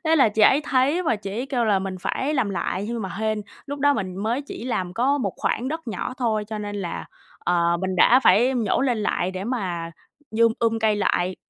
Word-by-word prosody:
thế 320 0 +3
là 265 -7 +5
chị 215 +1 0
ấy 265 +7 +6
thấy 275 +6 +2
và 315 -10 +1
chị 200 -1 -7
ấy 235 +6 -3
kêu 255 -4 0
là 205 -3 +3
mình 190 -1 -4
phải 265 +10 -1
làm 250 -8 +1
lại, 185 +1 -2
nhưng 235 -1 -3
mà 190 - -3
hên 215 -1 -1 0.2
lúc 285 0 -5
đó 285 +1 +3
mình 185 -5 -4
mới 220 +6 -1
chỉ 275 - -8
làm 185 -8 -2
có 270 +6 +2
một 255 - -1
khoảng 250 - -1
đất 320 -2 -5
nhỏ 225 +3 -4
thôi, 225 -5 0
cho 220 -1 -4
nên 205 0 -5
là, 180 -4 -4 0.3
ờ, 170 -1 +1
mình 190 0 -2
đã 250 +8 +6
phải 255 +1 +4
nhổ 225 -6 +1
lên 255 -4 +1
lại 185 -3 0
để 185 +1 -5
mà 185 -9 -3 0.4
dum 230 +1 +3
um 225 -1 +1
cây 220 -1 +2
lại. 185 -2 0
220 Hz, 235 wpm, -23 LUFS, 195-255 Hz, 0.4 s, ấy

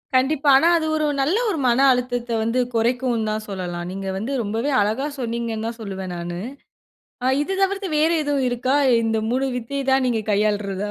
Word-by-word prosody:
கண்டிப்பா. 280 +3 +2
ஆனா, 320 - +3
அது 315 - -1
ஒரு 310 -1 0 0.2
நல்ல 305 +9 +1
ஒரு 360 - -1
மன 240 +1 +3
அழுத்தத்தை 245 -1 -1
வந்து 230 +3 0 0.2
குறைக்கும் 235 -1 0
தான் 215 0 -3
சொல்லலாம். 175 -3 -4
நீங்க 195 +1 -5
வந்து 220 +7 -4
ரொம்பவே 225 +7 -2
அழகா 220 +8 0
சொன்னீங்கன்னு 230 -2 -3
தான் 230 0 -6
சொல்லுவேன் 190 -3 -5
நானு. 175 0 -5 0.9
ஆ, - - +2 0.2
இது 340 - -3
தவிர்த்து 390 0 0
வேறு 320 +2 +3
எதுவும் 280 -3 0
இருக்கா, 250 +3 0 0.3
இந்த 225 -1 0
3 260 +2 0
வித்தை 275 +4 -3
தான் 265 0 +3
நீங்கள் 220 -3 -2
கையாள்றதா? 205 -1 0
235 Hz, 175 wpm, -22 LUFS, 210-270 Hz, 0.9 s, ஆனா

